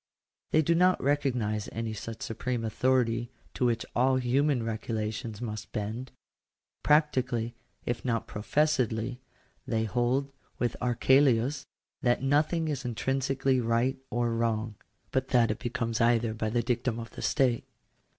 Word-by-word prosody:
They 155 Hz, -, +4 dB
do 170 Hz, -, +3 dB
not 180 Hz, +2 st, +4 dB
recognise 125 Hz, -7 st, 0 dB
any 115 Hz, -1 st, -3 dB
such 110 Hz, +2 st, -6 dB
supreme 115 Hz, +1 st, -2 dB
authority 120 Hz, 0 st, +1 dB, 0.2 s
to 125 Hz, -, 0 dB
which 115 Hz, -1 st, 0 dB
all 130 Hz, +2 st, +4 dB
human 130 Hz, +1 st, +2 dB
regulations 110 Hz, 0 st, -3 dB
must 110 Hz, -3 st, -5 dB
bend. 110 Hz, +5 st, -4 dB, 0.7 s
Practically, 130 Hz, -6 st, +2 dB, 0.3 s
if 120 Hz, -, -2 dB
not 115 Hz, -3 st, 0 dB
professedly, 125 Hz, -1 st, 0 dB, 0.5 s
they 110 Hz, -1 st, +1 dB
hold, 125 Hz, +5 st, 0 dB, 0.3 s
with 120 Hz, -, -1 dB
Archelaus, 130 Hz, +1 st, +3 dB, 0.3 s
that 120 Hz, +1 st, +2 dB
nothing 155 Hz, +4 st, +2 dB
is 140 Hz, -4 st, -2 dB
intrinsically 130 Hz, +2 st, 0 dB
right 120 Hz, +3 st, +1 dB
or 120 Hz, -1 st, 0 dB
wrong; 115 Hz, -1 st, 0 dB, 0.4 s
but 130 Hz, 0 st, 0 dB
that 120 Hz, -3 st, +3 dB
it 110 Hz, -, -4 dB
becomes 115 Hz, -2 st, -2 dB
either 115 Hz, -1 st, +3 dB
by 110 Hz, 0 st, -2 dB
the 120 Hz, +1 st, 0 dB
dictum 120 Hz, 0 st, 0 dB
of 115 Hz, -2 st, -7 dB
the -, -, -8 dB
state. 130 Hz, -5 st, +2 dB
120 Hz, 135 wpm, -29 LUFS, 115-130 Hz, 0.7 s, They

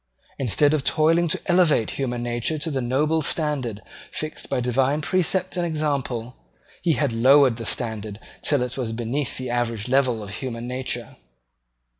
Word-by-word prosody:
Instead 135 Hz, -, +3 dB
of 150 Hz, -3 st, +1 dB
toiling 165 Hz, +4 st, +3 dB
to 160 Hz, -, 0 dB
elevate 175 Hz, -, +3 dB
human 125 Hz, -3 st, -3 dB
nature 120 Hz, +6 st, -1 dB
to 155 Hz, +2 st, -3 dB
the 135 Hz, -2 st, -1 dB
noble 150 Hz, +6 st, +1 dB
standard 135 Hz, -9 st, -1 dB, 0.3 s
fixed 155 Hz, 0 st, -6 dB
by 135 Hz, -, 0 dB
divine 130 Hz, +4 st, +1 dB
precept 185 Hz, +3 st, +1 dB
and 175 Hz, -, 0 dB
example, 140 Hz, -7 st, -2 dB, 0.5 s
he 170 Hz, -2 st, +2 dB
had 145 Hz, -5 st, 0 dB
lowered 130 Hz, +1 st, +5 dB
the 115 Hz, -, -6 dB
standard 110 Hz, -3 st, -2 dB, 0.2 s
till 145 Hz, -4 st, +2 dB
it 125 Hz, +2 st, -4 dB
was 115 Hz, -3 st, -2 dB
beneath 120 Hz, +5 st, -2 dB
the 130 Hz, -1 st, -4 dB
average 115 Hz, -2 st, -1 dB
level 125 Hz, -4 st, +2 dB
of 100 Hz, -, -8 dB
human 120 Hz, +1 st, -5 dB
nature. 130 Hz, +1 st, -4 dB
130 Hz, 160 wpm, -23 LUFS, 120-150 Hz, 0.5 s, lowered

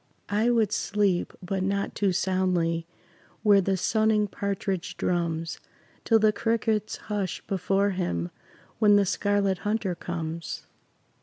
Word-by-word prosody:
I 215 Hz, +4 st, +2 dB
would 225 Hz, -4 st, +2 dB
sleep, 200 Hz, -3 st, +1 dB
but 190 Hz, +1 st, -2 dB
not 200 Hz, +1 st, -1 dB
too 200 Hz, -2 st, +1 dB
soundly, 175 Hz, -3 st, 0 dB, 0.6 s
Where 205 Hz, -2 st, +6 dB
the 195 Hz, 0 st, 0 dB
sunning 215 Hz, +2 st, +2 dB
partridge 195 Hz, -2 st, -3 dB
drums, 165 Hz, -2 st, -1 dB, 0.5 s
Till 225 Hz, -, +5 dB
the 215 Hz, -1 st, +4 dB
crickets 220 Hz, -2 st, 0 dB
hush 205 Hz, -4 st, -3 dB
before 195 Hz, +1 st, +1 dB
him 90 Hz, -, -2 dB, 0.5 s
When 205 Hz, -1 st, +6 dB
the 205 Hz, -1 st, +4 dB
Scarlet 200 Hz, -1 st, +1 dB
Hunter 210 Hz, -3 st, -1 dB
comes. 165 Hz, -1 st, -5 dB
195 Hz, 125 wpm, -27 LUFS, 180-210 Hz, 0.6 s, Where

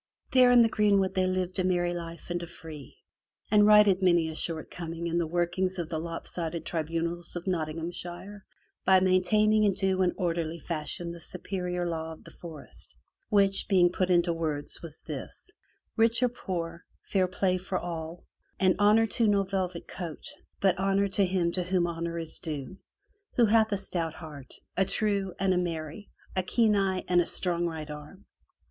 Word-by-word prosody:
There 255 Hz, -1 st, +6 dB
in 245 Hz, -1 st, +7 dB
the -, -, +4 dB
greenwood 200 Hz, -3 st, +2 dB
they 185 Hz, 0 st, +1 dB
lived 185 Hz, 0 st, -1 dB
a -, -, +2 dB
merry 175 Hz, -1 st, +1 dB
life 170 Hz, 0 st, -7 dB
and 175 Hz, 0 st, -1 dB
a 170 Hz, -, -6 dB
free, 160 Hz, -4 st, -11 dB, 0.5 s
and 210 Hz, -1 st, +6 dB
righted 210 Hz, -3 st, +6 dB
many 175 Hz, -3 st, +3 dB
a -, -, -5 dB
shortcoming 165 Hz, +1 st, -3 dB
in 170 Hz, 0 st, 0 dB
the 170 Hz, -, 0 dB
workings 175 Hz, +3 st, 0 dB
of 170 Hz, -2 st, -3 dB
the 160 Hz, -, -2 dB
lopsided 165 Hz, 0 st, -4 dB
tribunals 170 Hz, +1 st, -3 dB
of 175 Hz, -, -5 dB
Nottinghamshire 175 Hz, +3 st, -4 dB, 0.4 s
by 190 Hz, 0 st, +6 dB
maintaining 210 Hz, +4 st, +3 dB
in 205 Hz, -2 st, +3 dB
due 190 Hz, -1 st, +1 dB
and 180 Hz, -1 st, +2 dB
orderly 170 Hz, -2 st, -1 dB
fashion 170 Hz, +1 st, -3 dB
the 170 Hz, -, -9 dB
superior 180 Hz, 0 st, -3 dB
law 160 Hz, -1 st, -3 dB
of 160 Hz, -, -15 dB
the -, -, -13 dB
forest, 160 Hz, -4 st, -11 dB, 0.3 s
which, 200 Hz, -2 st, +4 dB
being 180 Hz, -3 st, +4 dB
put 185 Hz, 0 st, 0 dB
into 175 Hz, -1 st, +3 dB
words 155 Hz, -3 st, -3 dB
was 160 Hz, -2 st, -8 dB
this -, -, -7 dB, 0.2 s
— -, -, -49 dB
rich 230 Hz, +2 st, +3 dB
or 250 Hz, -, +4 dB
poor, 170 Hz, -7 st, -5 dB, 0.2 s
fair 190 Hz, -2 st, +1 dB
play 185 Hz, 0 st, 0 dB
for 185 Hz, 0 st, -3 dB
all; 165 Hz, -1 st, -6 dB, 0.3 s
and 185 Hz, -1 st, +4 dB
honor 210 Hz, +2 st, +5 dB
to 225 Hz, +1 st, +1 dB
no 200 Hz, -1 st, +3 dB
velvet 185 Hz, -3 st, -3 dB
coat, 170 Hz, -4 st, -7 dB, 0.3 s
but 190 Hz, -1 st, +2 dB
honor 195 Hz, +1 st, +2 dB
to 200 Hz, +1 st, +3 dB
him 180 Hz, -2 st, +1 dB
to 180 Hz, -, +1 dB
whom 180 Hz, 0 st, +1 dB
honor 170 Hz, 0 st, -3 dB
is 165 Hz, -1 st, -1 dB
due, 155 Hz, +3 st, -6 dB, 0.6 s
who 240 Hz, -, +5 dB
hath 220 Hz, 0 st, +3 dB
a 200 Hz, -, +1 dB
stout 170 Hz, -4 st, -3 dB
heart, 150 Hz, -5 st, -10 dB, 0.2 s
a -, -, +3 dB
true, 200 Hz, -2 st, 0 dB
and 190 Hz, 0 st, +2 dB
a -, -, +1 dB
merry, 165 Hz, +2 st, -4 dB, 0.3 s
a 185 Hz, -, +2 dB
keen 215 Hz, +3 st, +2 dB
eye, 190 Hz, -2 st, 0 dB
and 175 Hz, -1 st, +4 dB
a -, -, -1 dB
strong 175 Hz, -1 st, -1 dB
right 160 Hz, -2 st, -6 dB
arm. 150 Hz, +7 st, -10 dB
180 Hz, 180 wpm, -28 LUFS, 165-195 Hz, 0.6 s, in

